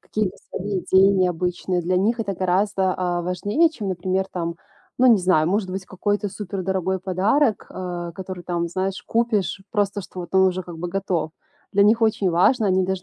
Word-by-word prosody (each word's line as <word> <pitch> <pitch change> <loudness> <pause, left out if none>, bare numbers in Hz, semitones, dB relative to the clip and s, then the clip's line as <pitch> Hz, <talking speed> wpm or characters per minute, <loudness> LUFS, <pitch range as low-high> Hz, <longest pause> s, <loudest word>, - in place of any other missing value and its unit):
Какие-то 210 -3 -2
свои 195 0 -3
идеи 190 +2 +5
необычные- 180 0 0
для 180 +2 0
них 225 +6 +1
это 200 -3 -2
гораздо, 190 +1 +1
а, 175 -1 -1
важнее 205 - +1
чем, 220 -10 -6
например, 185 +1 -1
там, 170 -1 -3 0.4
ну 255 - +5
не 230 -5 +7
знаю, 180 -4 +3
может 195 -1 0
быть 190 0 -5
какой-то 205 +2 -1
супер 195 -1 -5
дорогой 190 0 -1
подарок, 205 +7 +1
э, 175 -2 -5
который 185 -1 -6
там, 170 -1 -1
знаешь, 190 +2 -2
купишь 220 -4 0
просто, 205 -1 0
что 185 -1 -11
вот 175 +2 -9
он 190 - +6
уже 185 0 -3
как 175 -2 -9
бы 175 - -4
готов. 175 -4 -2 0.4
Для 200 0 +5
них 225 +2 +4
очень 215 -4 +2
важно, 205 +7 +3
они 185 0 +3
даже, 190 0 -2
190 Hz, 190 wpm, -23 LUFS, 180-205 Hz, 0.4 s, не